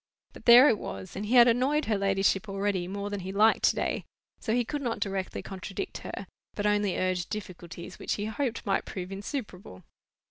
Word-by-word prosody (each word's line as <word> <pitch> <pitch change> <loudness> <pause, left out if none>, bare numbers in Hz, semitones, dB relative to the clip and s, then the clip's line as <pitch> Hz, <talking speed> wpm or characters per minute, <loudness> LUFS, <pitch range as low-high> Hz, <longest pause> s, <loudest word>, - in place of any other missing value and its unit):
But - - -14
there 245 +3 +9
it 215 - +3
was; 95 -1 -7
and 205 +2 -4
he 245 - +1
had 240 -1 +9
annoyed 260 +6 +2
her 220 - +1
ladyship 195 0 +1
already 195 -2 -1
more 200 +2 -4
than 205 - -3
he 190 +1 -5
liked 215 +3 +4
to - - +4
day, - - -1 0.4
so 220 - -3
he 240 +1 +2
could 295 +4 -3
not 240 -4 -2
directly 195 -1 -3
contradict 195 - -6
her, - - -7 0.3
but 205 - -2
only 205 -2 +1
urge 185 -2 -1
difficulties 180 -3 -7
which - - -2
he 205 - -3
hoped 230 +2 -3
might 195 - 0
prove 185 -1 -6
insuperable. 195 - -6
205 Hz, 200 wpm, -28 LUFS, 190-230 Hz, 0.4 s, there